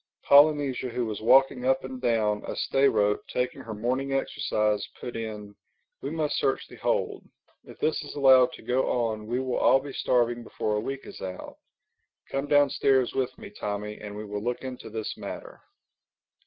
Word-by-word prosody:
Polynesia 140 -3 +4
who 120 0 -2
was 110 -2 -5
walking 135 +2 +4
up 130 +1 +2
and 130 -1 -7
down 110 -4 +1
a - - -4
stay 135 +1 +2
rope 105 0 +1
taking 125 0 -2
her 110 -2 -7
morning 130 +5 -1
exercise, 105 -5 0 0.2
put 120 - -6
in, 105 -2 -6 0.5
"We 135 - -3
must 155 -1 -1
search 135 - 0
the - - -13
hold. - - -1 0.4
If - - -13
this 155 - 0
is - - -9
allowed 130 -3 +6
to - - -11
go 125 +3 +1
on 110 -3 -1
we 120 +2 -1
will 130 -1 -2
all 135 - +5
be 140 0 -8
starving 120 -1 +1
before 105 -2 -2
a - - +1
week 135 +5 -5
is - - -10
out. 95 -1 -7 0.7
Come 135 +1 -2
downstairs 140 -3 +3
with 130 -1 -2
me, 200 - -10
Tommy, 105 - -5
and 105 -1 -8
we 105 +1 -6
will 105 0 -4
look 120 +3 -3
into 125 -3 -7
this 110 0 -4
matter." - - -8
125 Hz, 180 wpm, -27 LUFS, 110-135 Hz, 0.7 s, allowed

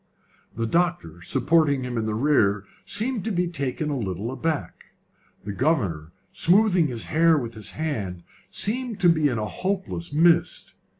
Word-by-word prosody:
The 115 0 -1
doctor, 140 - -1
supporting 140 - +2
him 125 -1 -4
in 110 -1 -1
the 110 - -1
rear, 110 -6 +2 0.2
seemed 225 0 -1
to 225 - -1
be 180 -2 0
taken 150 -2 -3
a 140 - -1
little 100 +2 -3
aback. 145 +3 -3 0.6
The 100 - -5
governor, 100 - 0 0.2
smoothing 185 -2 +3
his 120 -4 -4
hair 165 0 +4
with 120 -5 -4
his 110 -3 -7
hand, 105 - -3 0.3
seemed 235 0 -2
to 175 - +6
be 155 -3 +3
in 120 - -2
a 105 - -2
hopeless 185 - -3
mist. 170 - +2
145 Hz, 160 wpm, -24 LUFS, 110-175 Hz, 0.6 s, to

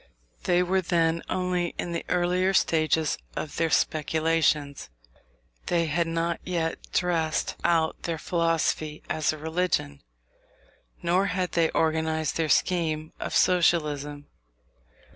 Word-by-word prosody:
They 180 0 +3
were 190 +1 +1
then 165 -2 +1
only 180 -2 -1
in 175 - -3
the 170 - -3
earlier 180 +2 +1
stages 160 -2 +2 0.2
of 150 - -5
their 165 -1 +1
speculations. 155 - +1 0.8
They 170 -1 +2
had 165 +2 0
not 165 0 -1
yet 170 -3 -3
dressed 165 -3 0
out 165 -2 +1
their 165 -2 -3
philosophy 165 -2 -1
as 155 -1 +1
a 155 - -6
religion, 160 - -1 1.0
nor 180 +3 +2
had 185 -2 -1
they 165 -2 +2
organized 160 0 0
their 160 -2 0
scheme 155 -3 +1
of - - -4
Socialism. 150 -5 +2
165 Hz, 120 wpm, -26 LUFS, 155-175 Hz, 1.0 s, They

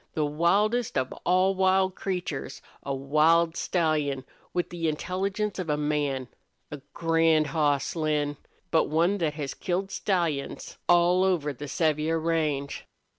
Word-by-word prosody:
The 155 - +1
wildest 200 +10 +1
of 130 -1 -1
all 185 +2 +4
wild 190 0 +2
creatures 180 -7 -4 0.2
a 140 - -5
wild 155 +5 +3
stallion, 150 -6 0 0.3
with 175 -1 -2
the 165 -2 -1
intelligence 195 +6 -2
of 180 -4 -4
a 150 - +1
man! 145 -3 -1 0.4
A 145 -2 -7
grand 165 -1 +3
hoss, 145 -2 0
Lin, 150 -2 0 0.3
but 160 - +4
one 170 +6 +1
thet 155 -3 -1
has 145 -3 -4
killed 190 +2 -2
stallions 170 -8 -2
all 175 +1 +5
over 165 -6 +1
the 145 +3 -8
Sevier 155 +2 +1
range. 155 -4 -1
160 Hz, 135 wpm, -27 LUFS, 150-180 Hz, 0.4 s, all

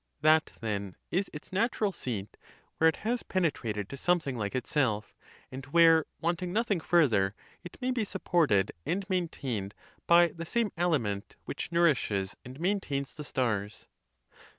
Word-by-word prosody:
That, 155 +1 +4
then, 100 -4 -3 0.2
is 190 +2 0
its 150 +4 -10
natural 210 0 +1
seat 110 - -5 0.4
where 160 - +6
it 160 - +3
has 240 +2 +1
penetrated 115 - -1
to 140 - -6
something 160 -4 +1
like 105 0 -3
itself, 125 -5 0 0.4
and 130 +1 -7
where, 165 +1 +6
wanting 175 +2 -1
nothing 210 -2 +1
further, 115 - +3 0.3
it 175 - -10
may 255 +1 0
be 250 -3 0
supported 170 - +1
and 195 - -2
maintained 130 - -2 0.3
by 170 0 +7
the 165 0 -7
same 215 +4 0
aliment 130 - -1
which - - -5
nourishes 135 - +2
and 130 +3 -10
maintains 165 -7 -1
the 150 - -7
stars. 105 -7 -2
155 Hz, 145 wpm, -30 LUFS, 110-175 Hz, 0.4 s, by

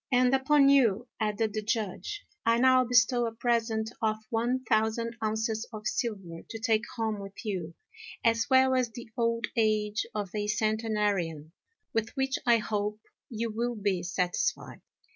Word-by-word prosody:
"And 250 0 +4
upon 275 +1 +4
you," 240 -4 +4
added 215 0 0
the 215 - -2
Judge, 220 - -3 0.2
"I 230 0 +3
now 255 +1 +5
bestow 245 0 +3
a 225 - -5
present 225 -2 0
of 215 -1 +1
one 240 +3 0
thousand 225 +1 0
ounces 220 +1 -1
of 215 -2 -8
silver 195 -8 -3
to 225 - -5
take 220 -1 +1
home 220 -3 -1
with 195 +3 -9
you, 180 -5 -4 0.5
as 230 0 +2
well 260 0 +5
as 255 -2 +1
the 225 0 -10
old 230 0 0
age 215 -2 +1
of 205 -3 -3
a 210 -1 -2
centenarian, 210 -7 0 0.4
with 225 0 0
which 265 +1 0
I 235 -1 +6
hope 210 -1 -2 0.3
you 230 -1 -3
will 240 +2 -2
be 200 -4 0
satisfied." 180 - -2
225 Hz, 155 wpm, -29 LUFS, 210-240 Hz, 0.5 s, I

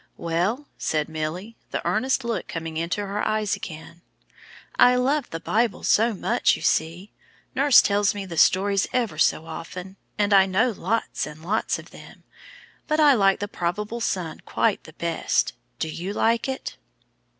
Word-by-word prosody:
"Well," 185 - -1
said 155 -1 0
Milly, 160 +8 -5
the - - -4
earnest 265 +1 +1
look 235 -1 -3
coming 165 -1 -5
into 170 +5 -2
her 200 +1 -3
eyes 215 -1 0
again, 170 -2 -9 0.8
"I 250 0 +7
love 270 +2 +1
the 165 - -5
Bible 225 +5 0
so 230 +3 +3
much, 235 +5 +2
you - - -9
see. 170 +6 0 0.4
Nurse 275 0 +6
tells 205 0 +2
me 200 -1 -4
the 175 -3 -7
stories 195 +4 +3
ever 230 -11 -1
so 160 - +2
often, 180 +4 -8 0.2
and 205 -1 +2
I 195 -1 +6
know 215 +7 +2
lots 215 -1 -2
and 155 +2 -11
lots 210 +5 0
of - - -13
them. - - -14 0.6
But 305 0 +1
I 295 -2 +7
like 195 -5 +3
the 205 - -2
probable 210 +6 -3
son 175 -7 -2
the - - 0
best. - - 0 0.2
Do - - -2
you 175 +5 -5
like 230 +4 +1
it?" 265 - -5
200 Hz, 160 wpm, -24 LUFS, 170-230 Hz, 0.8 s, I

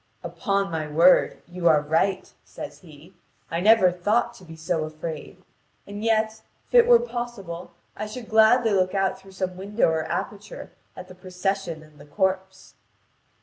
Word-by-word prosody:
"Upon 200 -3 -1
my 160 -2 -3
word, 165 +5 +4
you 175 0 -2
are 155 -2 +6
right," 165 +6 -1
says - - -9
he: 160 +1 -16 0.4
"I 165 - -1
never 205 -1 +5
thought 210 +7 0
to 190 - -16
be 165 -2 -11
so 160 0 -2
afraid. 155 0 -8 0.4
And 205 +1 -7
yet, 220 -1 +1 0.3
if - - -32
it 480 -1 +7
were 485 -1 +8
possible 240 - -6 0.2
I 215 - -5
should 225 +2 -8
gladly 220 +1 +4
look 185 -1 +1
out 195 -1 0
through 195 0 -16
some 185 -1 -4
window 200 +1 +1
or 160 -1 -1
aperture 205 +3 -6 0.3
at 180 - -9
the 185 - -12
procession 185 -2 -4
and 155 -1 -20
the 145 - -14
corpse." 190 +2 -2
190 Hz, 165 wpm, -24 LUFS, 170-210 Hz, 0.4 s, were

